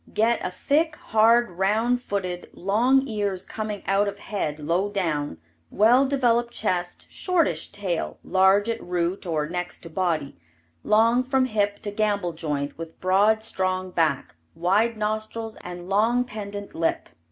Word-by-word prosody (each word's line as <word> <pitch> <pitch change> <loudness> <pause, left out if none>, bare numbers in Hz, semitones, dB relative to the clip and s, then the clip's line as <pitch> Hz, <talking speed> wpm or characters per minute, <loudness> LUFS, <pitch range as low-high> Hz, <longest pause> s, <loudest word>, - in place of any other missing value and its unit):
Get 225 +2 +1
a - - -1
thick, 305 - 0
hard, 230 -1 +3
round 215 +7 +1
footed, 185 -6 -3
long 245 +8 +2
ears 205 -5 -2
coming 215 -2 -5
out 195 +1 +2
of 200 0 -4
head 190 -8 -3
low 170 +6 0
down, 155 - -2 0.3
well 245 +6 +4
developed 240 -3 +2
chest, 180 -4 -2
shortish 330 - 0
tail, 195 -5 -3
large 190 +3 +4
at 230 0 -2
root 180 +2 -2
or 155 -3 -1
next 175 +1 -5
to 165 - -11
body, 165 -5 -1 0.5
long 230 +3 +3
from 260 0 +2
hip 205 -3 -1
to 205 - -3
gamble 205 -4 0
joint, 150 -3 -3
with 165 0 -8
broad 205 +4 +3
strong 185 -3 -1
back, 160 - 0 0.2
wide 205 +7 +2
nostrils 215 +1 -3
and 175 0 -8
long 225 +5 +2
pendant 205 -4 -7
lip. 165 0 -1
205 Hz, 145 wpm, -25 LUFS, 180-225 Hz, 0.5 s, well